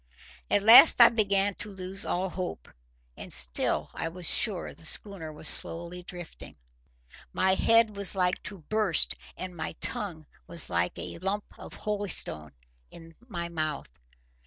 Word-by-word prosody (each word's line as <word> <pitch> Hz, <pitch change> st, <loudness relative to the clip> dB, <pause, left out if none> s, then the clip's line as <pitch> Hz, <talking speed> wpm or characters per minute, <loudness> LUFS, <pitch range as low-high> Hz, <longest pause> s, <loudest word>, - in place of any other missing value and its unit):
At 205 Hz, -, +1 dB
last 230 Hz, +9 st, +9 dB
I 235 Hz, -, +9 dB
began 200 Hz, -3 st, +1 dB
to 210 Hz, -, -4 dB
lose 190 Hz, 0 st, -7 dB
all 185 Hz, +2 st, -1 dB
hope. 180 Hz, -, -6 dB, 0.5 s
And -, -, -10 dB
still 60 Hz, -2 st, +1 dB
I 165 Hz, -, -4 dB
was 175 Hz, +1 st, -6 dB
sure 200 Hz, -6 st, +2 dB
the -, -, -12 dB
schooner 165 Hz, -1 st, 0 dB
was 150 Hz, 0 st, -4 dB
slowly 170 Hz, +2 st, -2 dB
drifting. 175 Hz, -1 st, -10 dB, 0.8 s
My 190 Hz, 0 st, +2 dB
head 225 Hz, +1 st, +3 dB
was 200 Hz, 0 st, +2 dB
like 180 Hz, -1 st, 0 dB
to 200 Hz, -4 st, -7 dB
burst, 210 Hz, -1 st, +1 dB, 0.2 s
and 185 Hz, -1 st, -7 dB
my 160 Hz, -, -5 dB
tongue 160 Hz, -2 st, -5 dB, 0.2 s
was 170 Hz, -, -2 dB
like 85 Hz, 0 st, -1 dB
a -, -, -7 dB
lump 195 Hz, +3 st, -3 dB
of -, -, -10 dB
holystone 200 Hz, -, -1 dB, 0.4 s
in 165 Hz, 0 st, -14 dB
my 170 Hz, -7 st, -5 dB
mouth. 155 Hz, -, -5 dB
180 Hz, 150 wpm, -27 LUFS, 165-200 Hz, 0.8 s, last